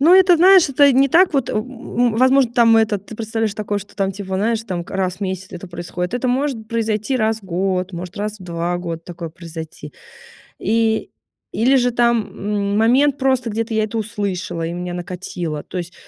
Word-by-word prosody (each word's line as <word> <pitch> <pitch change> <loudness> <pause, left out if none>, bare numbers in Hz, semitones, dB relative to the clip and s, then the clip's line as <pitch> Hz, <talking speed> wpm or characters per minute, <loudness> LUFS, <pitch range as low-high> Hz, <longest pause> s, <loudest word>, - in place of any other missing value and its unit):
Ну 330 +6 +6
это, 370 -2 +6
знаешь, 365 -1 +6
это 280 +1 +5
не 270 +2 +4
так 350 +6 +4
вот, 270 -3 +1
в - - -4
м 245 0 -1
возможно, 260 -1 +4
там 230 -2 +5
этот 210 -3 +1
ты 220 - -9
представляешь 220 -1 -2
такое, 210 -1 -2
что 200 - -12
там 195 -1 0
типа, 190 -1 -4
знаешь, 225 +2 0
там 180 -6 -4
к - - -15
раз 185 -2 -1
в - - -25
месяц 190 -1 -4
это 180 +1 -8
происходит. 175 +2 -5
Это 250 +1 -1
может 250 -4 -1
произойти 225 +2 -1
раз 220 -1 +1
в - - -19
год, 185 +1 -1
может 180 +3 -7
раз 210 +1 -4
в - - -10
2 170 0 -2
года 170 -2 -5
такое 170 -1 -7
произойти. 165 -1 -9 0.7
И 225 0 +1 0.4
или 255 +5 +3
же 245 -1 +3
там, 235 -2 +2
м 205 0 -2
момент, 260 +6 +3
просто 260 -3 +1
где-то 225 +2 -3
я 220 0 +2
это 225 +1 -5
услышала 195 -6 -3
и 165 - -3
меня 180 0 -5
накатило. 175 -4 -5
То 185 - -7
есть 175 +1 -7
215 Hz, 205 wpm, -20 LUFS, 185-240 Hz, 0.7 s, Ну